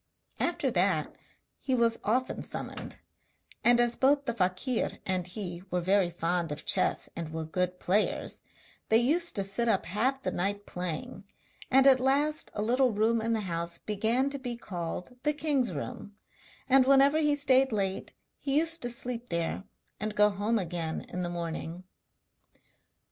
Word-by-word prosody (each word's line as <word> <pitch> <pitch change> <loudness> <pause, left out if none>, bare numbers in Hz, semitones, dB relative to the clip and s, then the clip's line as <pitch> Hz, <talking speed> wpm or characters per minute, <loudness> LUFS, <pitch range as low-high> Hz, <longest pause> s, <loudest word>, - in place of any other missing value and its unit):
After 315 -6 0
that 180 -5 +1 0.4
he 260 - 0
was 230 -1 +2
often 250 +5 0
summoned; - - -6 0.7
and 240 0 +5
as 240 0 +3
both 280 +1 +3
the 235 - -1
fakir 190 +5 -1
and 185 -2 -1
he 180 -2 -6
were 180 - 0
very 190 +1 +2
fond 170 -1 -1
of 150 - -6
chess - - +1
and 165 -2 -5
were 160 0 -4
good 180 +2 -2
players, 200 +4 0 0.5
they 220 - +6
used 320 +9 +2
to 200 - 0
sit 195 +5 -1
up 195 - +1
half 255 +9 -1
the - - -1
night 200 +3 -1
playing, 180 +2 -5 0.4
and 270 +1 +5
at 265 -2 +7
last 290 +4 +1
a 210 - -1
little 250 +3 +3
room 220 +2 +2
in 230 +1 0
the 220 - 0
house 170 -2 -3
began 225 +6 0
to 280 - -4
be 245 -2 -4
called 180 +3 -6
the 300 +2 +1
king's 290 -6 0
room, 180 +6 -6 0.5
and 265 -1 +5
whenever 275 +2 +5
he 295 -2 +3
stayed 270 -2 +4
late 195 -3 -2 0.3
he 275 0 0
used 330 +1 +2
to 240 - 0
sleep 240 0 -3
there 170 +3 -2 0.3
and 215 0 -3
go 210 0 +5
home 205 +3 0
again 170 -4 -3
in 180 - -4
the 175 - -2
morning. 170 0 -5
215 Hz, 165 wpm, -29 LUFS, 180-260 Hz, 0.7 s, at